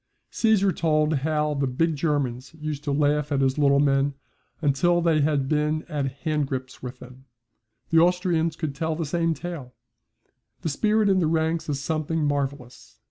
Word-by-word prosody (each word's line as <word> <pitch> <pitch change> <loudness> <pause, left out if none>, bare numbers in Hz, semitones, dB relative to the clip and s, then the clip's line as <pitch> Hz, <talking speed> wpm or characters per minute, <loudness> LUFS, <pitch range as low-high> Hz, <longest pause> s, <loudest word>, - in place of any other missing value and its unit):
Caesar 210 -4 +3
told 155 -3 +1
how 150 +1 0
the 140 -1 0
big 160 +6 0
Germans 140 -3 -2
used 150 -2 -4
to 145 - -1
laugh 150 +1 +1
at 140 -1 +1
his 135 +2 +1
little 140 -1 +4
men 140 0 +2 0.4
until 170 +4 +2
they 165 -3 +2
had 145 -2 +1
been 150 +1 0
at 140 -2 -4
handgrips 135 -4 -2
with 125 0 -7
them. 130 +1 -14 0.7
The 165 - +6
Austrians 170 -2 +2
could 155 -4 -3
tell 160 +3 -2
the 165 0 -3
same 165 +2 0
tale. 150 -9 -7 0.9
The 160 - -2
spirit 215 +8 +2
in 190 -1 +3
the 165 - +2
ranks 160 0 0
is 140 -2 -1
something 155 0 -1
marvellous. 140 -4 -4
150 Hz, 165 wpm, -25 LUFS, 140-165 Hz, 0.9 s, The